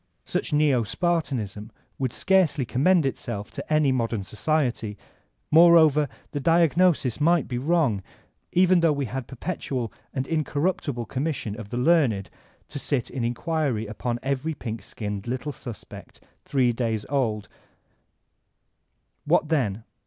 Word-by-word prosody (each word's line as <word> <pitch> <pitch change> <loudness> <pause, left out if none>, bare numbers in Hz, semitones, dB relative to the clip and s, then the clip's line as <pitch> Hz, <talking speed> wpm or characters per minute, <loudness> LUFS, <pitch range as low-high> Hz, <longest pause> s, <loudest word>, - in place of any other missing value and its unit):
Such - - -2
neo 145 -4 +3
Spartanism 115 - -2 0.3
would 130 -3 -1
scarcely 185 -7 +2
commend 155 +7 +3
itself 115 -6 -4
to - - -8
any 155 -3 +4
modem 115 -5 -1
society 115 -1 -1 0.5
Moreover 160 -3 +6 0.2
the 145 - -3
diagnosis 165 -3 +3
might 170 +1 +3
be 120 -2 -3
wrong, 140 - +1 0.5
even 185 0 +4
though 165 -2 +4
we 140 -1 -2
had 130 +2 -4
a - - -35
perpetual 130 - -4 0.2
and 130 -1 -3
incorruptible 150 -5 -1
commission 130 -6 -3
of 105 -2 -8
the 120 - -4
learned 125 - +2 0.4
to 145 - -5
sit 135 -3 -1
in 130 - -3
inquiry 125 -1 -1
upon 120 +3 -3
every 140 +4 -1
pink 115 -5 -5
skinned 105 -1 -6
little 130 +4 -3
suspect 120 -5 -10 0.3
three 125 -4 +2
days 115 -3 -2
old 110 -7 0
I - - -28 1.7
What 155 - +2
then 115 -9 0
135 Hz, 135 wpm, -25 LUFS, 115-155 Hz, 1.7 s, Moreover